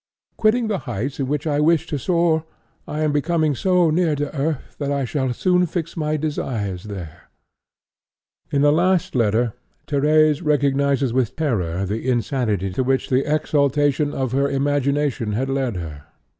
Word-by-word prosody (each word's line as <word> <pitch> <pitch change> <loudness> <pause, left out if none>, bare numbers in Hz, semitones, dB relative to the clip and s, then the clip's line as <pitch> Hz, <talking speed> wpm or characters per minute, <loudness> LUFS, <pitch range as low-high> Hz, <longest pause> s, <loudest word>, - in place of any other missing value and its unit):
'Quitting 225 +2 +2
the 205 -4 -1
heights 120 +6 -3
in 135 - -1
which 150 +2 -2
I 145 -2 +1
wished 160 +1 +2
to 145 - -2
soar, 170 +1 +1 0.4
I 150 - -3
am 155 -1 +1
coming 155 -1 +1
so 180 +3 +2
near 165 -1 +2
to 145 +1 -4
earth 145 0 -3
that 140 -1 -2
I 140 -2 0
shall 130 0 -1
soon 180 +7 +2
fix 165 0 -4
my 155 -1 -1
desires 115 - -3
there.' 95 -7 -9 1.2
In 140 0 +1
a 145 - +6
last 175 +2 +2
letter 115 -1 +1 0.3
Thérèse 150 +2 +3
recognizes 140 -3 +1
with 125 -3 0
terror 100 - -1
the 110 +6 -3
insanity 115 -5 0
to 130 - -1
which 130 +1 0
the 135 +3 +1
exaltation 145 -1 +1
of 130 -4 -2
her 140 +2 +1
imagination 140 -4 0
had 130 +5 -1
led 135 -5 -1
her. 75 -5 -7
140 Hz, 160 wpm, -21 LUFS, 125-155 Hz, 1.2 s, a